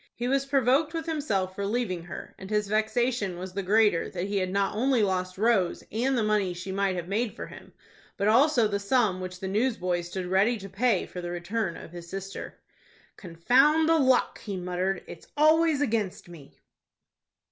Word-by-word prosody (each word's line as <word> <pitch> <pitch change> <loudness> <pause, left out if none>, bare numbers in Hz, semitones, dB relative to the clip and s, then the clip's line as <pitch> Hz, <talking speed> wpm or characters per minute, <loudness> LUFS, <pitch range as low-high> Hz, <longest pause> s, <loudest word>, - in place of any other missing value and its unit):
He 240 - -3
was 275 +1 +1
provoked 275 +4 +2
with 325 -1 -3
himself 220 - -1
for 200 - -4
leaving 200 -5 -2
her, 175 - -8
and 190 - -9
his 210 -1 0
vexation 220 -2 0
was 185 +1 -7
the 200 - -2
greater 205 -2 +3
that 180 0 -4
he 200 0 -2
had 185 -1 0
not 195 +1 0
only 250 0 +2
lost 185 -2 -1
Rose 205 -4 +1
and 255 +5 0
the 225 - +1
money 210 -4 +1
she 185 +2 -6
might 195 -1 0
have 175 -1 -4
made 215 +4 -1
for - - -6
him, - - -13 0.5
but 200 -1 0
also 245 +1 +4
the 200 -1 -2
sum 200 -3 +1
which 185 0 -6
the 190 - -4
newsboy 190 -4 0
stood 180 +2 -5
ready 195 +6 +2
to 195 -1 -9
pay 205 0 +1
for 180 - -8
the 175 - -5
return 175 +1 -3
of - - -11
his 170 -1 -10
sister. 195 +1 -7 0.6
"Confound 260 - +3
the 325 0 +4
luck!" 260 -3 +2
he 200 -3 -5
muttered. 180 +1 -2
"It's 165 - -11
always 310 0 +4
against 215 -8 -1
me." 165 -5 -14
200 Hz, 190 wpm, -27 LUFS, 185-245 Hz, 0.6 s, also